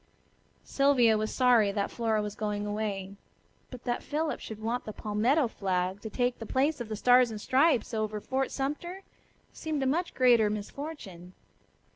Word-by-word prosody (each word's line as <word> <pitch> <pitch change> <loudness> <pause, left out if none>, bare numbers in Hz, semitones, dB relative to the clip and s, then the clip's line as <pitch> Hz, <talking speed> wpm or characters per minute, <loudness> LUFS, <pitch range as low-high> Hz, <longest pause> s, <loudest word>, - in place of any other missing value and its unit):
Sylvia 265 -5 +3
was 215 0 -1
sorry 240 -5 +4
that 200 0 -2
Flora 220 -2 0
was 210 -1 -4
going 210 -1 -3
away, 200 -2 -3 0.5
but 250 -2 -10
that 240 0 -2
Philip 310 +1 -2
should 220 -1 -8
want 230 +3 -2
the 215 - -6
palmetto 235 +9 +1
flag 190 -2 -2
to 220 - -6
take 245 +2 -1
the 225 - -6
place 275 +1 +1
of 230 - -6
the 215 - -3
Stars 245 +3 +5
and 215 -1 -6
Stripes 260 0 +2
over 215 -1 -2
Fort 265 +5 -1
Sumter 345 +8 -4 0.5
seemed 310 -3 -3
a - - 0
much 330 +7 -1
greater 240 -4 +5
misfortune. 205 - -7
230 Hz, 165 wpm, -29 LUFS, 210-265 Hz, 0.5 s, Stars